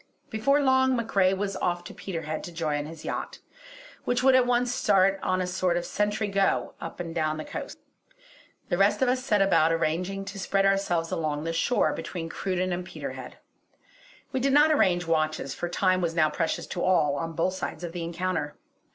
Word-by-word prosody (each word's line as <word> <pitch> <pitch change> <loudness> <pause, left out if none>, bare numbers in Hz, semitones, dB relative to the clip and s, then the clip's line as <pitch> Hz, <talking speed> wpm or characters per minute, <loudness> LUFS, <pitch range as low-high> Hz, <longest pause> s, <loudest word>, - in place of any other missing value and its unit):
Before 265 +6 +2
long, 260 -1 +3
MacRae 200 -5 +2
was 195 0 -2
off 175 0 -1
to - - -9
Peterhead 165 -4 -5
to 175 - -8
join 150 -3 -2
his 160 0 -10
yacht, - - -4 0.7
which 245 0 0
would 265 0 +6
at 255 -1 +5
once 245 0 +2
start 195 -3 +3
on 185 0 0
a - - 0
sort 180 -1 0
of 175 - -2
sentry 210 +1 -1
go 195 -1 +1
up - - -7
and 165 -2 -5
down 155 -2 0
the 155 - -6
coast. - - -6 0.9
The 175 - 0
rest 200 +6 +3
of 255 - +3
us 255 0 0
set 210 -5 +3
about 165 -4 +4
arranging 180 +4 -1
to 195 +1 -7
spread 195 0 +1
ourselves 195 -4 +1
along 150 -2 -2
the 165 0 -2
shore 210 +9 +2
between 165 -3 -5
Cruden 185 0 -2
and 180 +1 -3
Peterhead. 180 - -8 0.9
We 265 - -1
did 270 +1 +1
not 300 +2 +6
arrange 180 -11 +3
watches, 155 -4 0
for 175 - -4
time 185 +1 +2
was 165 -1 -1
now 155 -2 +3
precious 165 +1 -1
to 175 - -5
all, 160 -6 +3
on 165 +3 -4
both 170 +3 0
sides 185 - -5
of 170 - -4
the 175 0 -5
encounter. 170 -3 -2
185 Hz, 195 wpm, -27 LUFS, 165-205 Hz, 0.9 s, would